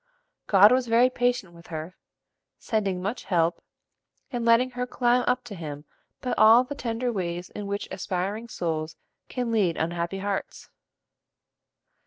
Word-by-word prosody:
God 205 +2 +7
was 255 -1 +2
very 235 +3 +4
patient 245 -8 0
with 170 0 -15
her, 160 +2 -6 0.6
sending 195 -5 -1
much 210 +6 -3
help, 170 -2 +1 0.7
and 240 -3 -2
letting 235 +2 +4
her 250 0 -3
climb 245 0 +2
up 250 0 +1
to 240 - -9
Him 150 -5 -7 0.4
by 250 - -2
all 225 +3 +8
the 255 - -6
tender 245 -2 -2
ways 175 -3 -3
in 205 -1 -6
which 200 0 -3
aspiring 195 +5 -3
souls 160 -5 -3 0.3
can 245 -2 -2
lead 195 -7 +2
unhappy 170 +3 -2
hearts. 200 0 -4
205 Hz, 145 wpm, -26 LUFS, 175-245 Hz, 0.7 s, all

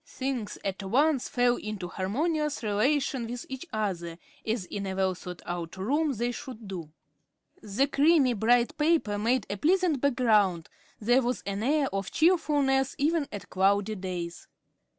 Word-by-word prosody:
Things 260 -5 -4
at 195 0 -2
once 265 +7 +2
fell 245 0 +2
into 210 -4 -5
harmonious 295 - -1
relation 245 +3 +1
with 240 +1 -6
each 265 +6 -6
other, 175 -6 -3 0.3
as 220 -3 -2
in 200 +1 -5
a 190 - -3
well 190 -1 +1
thought 180 0 -9
out 175 0 -5
room 290 +10 +1
they 240 +1 -1
should 235 -3 -8
do. 170 -5 -6 0.7
The 215 +6 +1
creamy, 285 -2 +4
bright 235 +2 +2
paper 300 -10 +2
made 240 +4 +1
a 200 - -4
pleasant 335 - +2
background; 215 - +2 0.3
there 245 +4 +3
was 250 0 -2
an 200 +1 -3
air 285 +4 +2
of 195 -1 -2
cheerfulness 290 -6 +2
even 305 +1 +1
on 205 - -4
cloudy 200 +3 +2
days. 180 -3 -5
235 Hz, 150 wpm, -28 LUFS, 195-275 Hz, 0.7 s, creamy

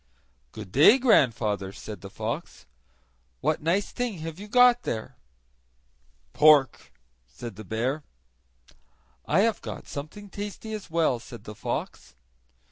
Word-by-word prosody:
"Good 105 -4 -9
day, 150 - +7
grandfather!" 115 - +2
said 105 +1 -9
the 100 - -9
fox. - - -5 0.7
"What 155 +2 0
nice 175 +6 0
thing 245 -5 -3
have 165 +2 -6
you 205 - -8
got 245 +1 +5
there?" 110 - -4 1.2
"Pork," 150 -3 +4 0.4
said 95 +11 -9
the 110 - -9
bear. 120 - -2 1.3
"I 170 +6 +3
have 225 +1 +1
got - - -7
something 155 +9 -7
tasty 205 +2 -6
as 210 -4 -6
well," 160 -7 +1
said 120 0 -11
the 105 - -8
fox. - - -5
150 Hz, 125 wpm, -26 LUFS, -, 1.3 s, day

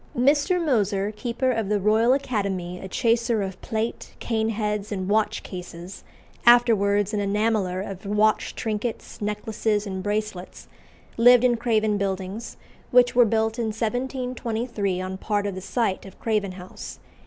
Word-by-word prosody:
Mr. 290 +8 +3
Moser, 210 - +1
keeper 245 +3 -1
of 225 -4 -1
the 210 -1 +2
Royal 220 +4 +3
Academy, 195 -9 -2
a 190 - -7
chaser 230 0 +1
of 190 -1 -6
plate, 220 +1 -4
cane 220 -1 -1
heads, 210 -1 -2
and 190 -2 -3
watch 215 +1 +1
cases, 180 0 -8 0.4
afterwards 210 -4 +4
an 210 - 0
enameller 205 -2 0
of 195 +1 -8
watch 210 +1 +2
trinkets, 220 +1 -4
necklaces, 210 0 -1
and 190 -2 -4
bracelets, 205 -2 -4 0.5
lived 245 +1 +7
in 245 -1 +4
Craven 220 -3 +1
Buildings, 195 +2 -4 0.3
which 245 0 +5
were 245 -1 +6
built 220 +1 0
in 235 - 0
1723 235 -3 -2
on 185 0 -4
part 205 -1 -1
of 200 - -2
the 190 - -6
site 200 -1 -1
of 195 - -14
Craven 210 -4 -1
House. 185 0 -9
215 Hz, 145 wpm, -24 LUFS, 200-235 Hz, 0.5 s, lived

